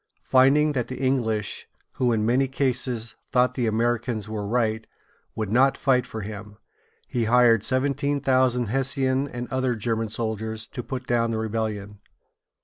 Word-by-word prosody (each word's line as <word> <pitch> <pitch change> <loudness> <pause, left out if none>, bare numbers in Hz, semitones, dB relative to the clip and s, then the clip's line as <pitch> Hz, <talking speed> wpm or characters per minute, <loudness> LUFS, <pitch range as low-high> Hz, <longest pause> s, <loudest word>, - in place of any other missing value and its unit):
Finding 140 +4 +4
that 125 -5 -2
the 130 - -6
English, 115 -6 -1 0.3
who 125 -2 +2
in 110 -2 +1
many 130 +4 +2
cases 125 -4 -2 0.2
thought 125 -1 +3
the 125 -3 -1
Americans 115 -1 0
were 105 -2 -4
right, 110 -1 0 0.5
would 110 -3 -3
not 135 +4 +4
fight 125 -3 +2
for 110 - -6
him, 105 0 -8 0.5
he 120 -2 -1
hired 115 -2 +5
seventeen 140 +3 0
thousand 130 -4 +2
Hessian 135 +2 0
and 120 -2 -6
other 130 -2 0
German 115 0 -2
soldiers 110 0 -3
to 125 - -6
put 130 +1 -6
down 115 -2 +1
the 115 - -1
rebellion. 105 -2 -3
120 Hz, 150 wpm, -25 LUFS, 110-130 Hz, 0.5 s, hired